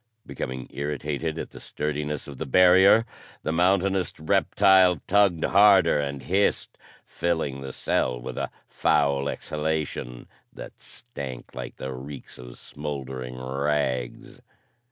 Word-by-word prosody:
Becoming 65 -2 -5
irritated 75 +2 -3
at - - -6
the - - -11
sturdiness 75 -1 -4
of 70 -2 -10
the - - -4
barrier, 90 - +6 0.4
the - - -1
mountainous 95 +2 +1
reptile 95 +3 +4
tugged 100 -4 +3
harder 95 -5 +5
and 70 -1 -4
hissed, 100 +2 0 0.3
filling 80 -6 -2
the 65 -1 -6
cell 60 -1 -1
with 65 +1 -7
a - - -3 0.2
foul 70 -2 +1
exhalation 75 -6 -4 0.2
that - - -11
stank 70 - -9
like 65 -1 -7
the 65 0 -6
reeks 65 +1 -9
of - - -11
smoldering 65 -4 -6
rags. 65 -1 -2
75 Hz, 120 wpm, -25 LUFS, 65-90 Hz, 0.4 s, barrier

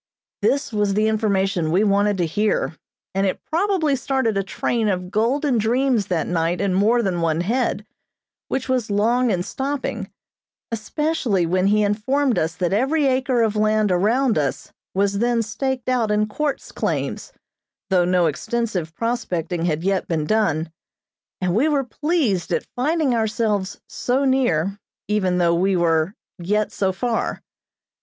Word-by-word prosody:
This 275 -4 +1
was 205 -2 +1
the 215 +1 +2
information 195 -5 +1
we 185 +6 +3
wanted 205 0 +2
to 175 - +1
hear, 205 0 0 0.4
and 195 +1 +1
it 185 - -4
probably 335 -4 +1
started 265 -4 0
a 195 - +2
train 220 +3 -1
of 180 -2 -2
golden 245 +4 +1
dreams 235 -1 +1
that 175 -4 0
night 170 0 0
in 200 -2 0
more 220 +5 +3
than 180 -4 -1
one 165 0 +1
head, 220 0 -1 0.6
which 265 - -2
was 255 -4 0
long 235 +5 +2
in 180 -4 0
stopping, 275 +6 -3 0.6
especially 230 - 0
when 185 +3 +1
he 210 +1 +3
informed 240 +6 +1
us 160 +1 -1
that 180 -1 -1
every 275 +8 +2
acre 260 -2 +2
of 220 -1 0
land 215 -1 +2
around 220 - +2
us 140 -2 -3 0.2
was 200 +1 +1
then 235 0 +2
staked 260 +3 -3
out 245 -4 +1
in 210 0 +2
quartz 280 +7 -3
claims, - - -3 0.6
though 180 -2 +4
no 180 0 +2
extensive 180 0 -2
prospecting 175 -8 -2
had 160 -1 -1
yet 195 0 0
been 160 -3 -1
done, 165 -6 +1 0.7
and 180 -2 0
we 245 +10 +3
were 285 -2 +1
pleased 255 - -1
at - - 0
finding 295 +1 +1
ourselves 215 -3 -1
"so 260 +3 0
near" 205 -8 +1 0.3
even 190 -4 +1
though 170 -1 +3
we 190 +3 +2
were 165 +2 +1 0.2
"yet 210 +4 0
so 195 -1 0
far." 225 +5 -2
210 Hz, 155 wpm, -22 LUFS, 185-245 Hz, 0.7 s, though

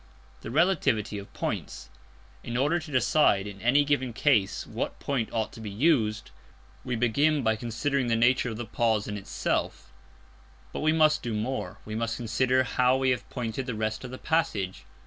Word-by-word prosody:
_ - - -28
The - - -7
Relativity 130 - +1
of 100 - -11
Points. - - -5 0.5
In 120 0 -3
order 150 +7 +2
to 160 -2 -10
decide 130 -6 +3
in 100 -1 -8
any 140 +5 +4
given 130 -4 0
case 110 -7 +2
what - - -4
point 130 -6 -1
ought 110 -2 -1
to 115 - -10
be 105 - -5
used, 110 - +1 0.5
we 125 - -2
begin 140 +6 +2
by 110 -1 +2
considering 120 +4 -1
the 115 - +2
nature 125 +2 +3
of 110 - -5
the 120 - -4
pause 110 -2 0
in 105 - -4
itself. 100 - -3 0.8
But - - -3
we 155 +1 +2
must 155 -1 +4
do 115 -3 -3
more. 105 -4 -3
We 110 - -6
must 115 +1 -2
consider 125 +3 +1
how 125 +1 +2
we 130 -1 +2
have 125 - -3
pointed 125 +1 -4
the 125 - -3
rest 110 +1 -2
of 125 - -6
the 130 - -7
passage. 110 - -1
120 Hz, 185 wpm, -27 LUFS, 110-140 Hz, 0.8 s, any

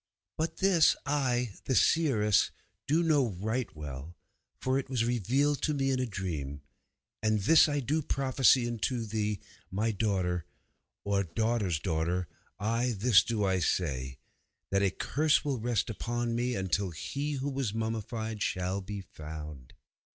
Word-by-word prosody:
But 160 +1 -2
this 190 -4 +5
I, 125 -6 0
the 130 - +1
seeress, 110 - +3 0.4
do 160 +5 +3
know 140 - +2
right 110 +3 -1
well, 75 +2 -7 0.4
for 130 +1 +1
it 135 - -6
was 125 -4 +1
revealed 130 +5 +1
to 150 - +1
me 135 -1 +1
in 130 - 0
a 130 - 0
dream. 80 -9 -4 0.6
And 110 -1 +2
this 160 +8 +6
I 145 -1 0
do 150 +5 0
prophesy 130 -3 +3
unto 120 +1 -1
thee, 105 -2 -2 0.3
my 110 +4 0
daughter, 95 -5 0 0.6
or 100 -1 +1
daughter's 105 -1 0
daughter, 85 +2 -1 0.3
ay, 115 +3 0
this 105 -3 +5
do 110 -3 -1
I 95 -1 +2
say, 65 -7 -1 0.5
that 100 0 +3
a 100 - +3
curse 150 - +1
will 135 -4 -1
rest 115 -2 0
upon 120 +1 -2
me 120 +1 0
until 95 0 0
He 140 - -3
who 140 +1 -2
was 135 -5 -1
mummied 110 -1 -3
shall 90 +2 -1
be 100 +1 -6
found. 75 -6 -9
110 Hz, 150 wpm, -30 LUFS, 95-130 Hz, 0.6 s, this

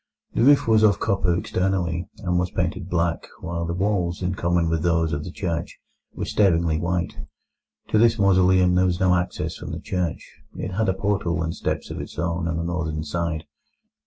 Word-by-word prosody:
The - - 0
roof 140 0 +5
was 110 -1 +5
of 105 -4 +4
copper 90 -3 +1
externally, 90 -3 -1
and 90 -1 +1
was 90 0 0
painted 90 - -2
black, 85 -1 0
while 85 -2 -3
the 85 - -2
walls, 95 -2 0
in 90 +1 0
common 85 -2 +1
with 80 -1 0
those 85 -2 +1
of 75 0 -2
the - - -6
church, 85 -4 -3 0.4
were - - -3
staringly 85 -5 +2
white. 85 -1 -2 0.7
To 110 - +3
this 115 0 +4
mausoleum 95 -2 +4
there 90 +1 +3
was 90 0 -1
no 95 -2 +4
access 90 0 -2
from - - -7
the - - -4
church. 90 -4 -3 0.3
It 95 - -4
had 105 +2 0
a 95 - +1
portal 95 -5 0
and 80 +1 -3
steps - - -3
of - - -4
its - - -9
own 85 0 -1
on 80 0 -1
the 85 - -2
northern 85 -3 -2
side. 80 0 -2
90 Hz, 195 wpm, -24 LUFS, 85-95 Hz, 0.7 s, roof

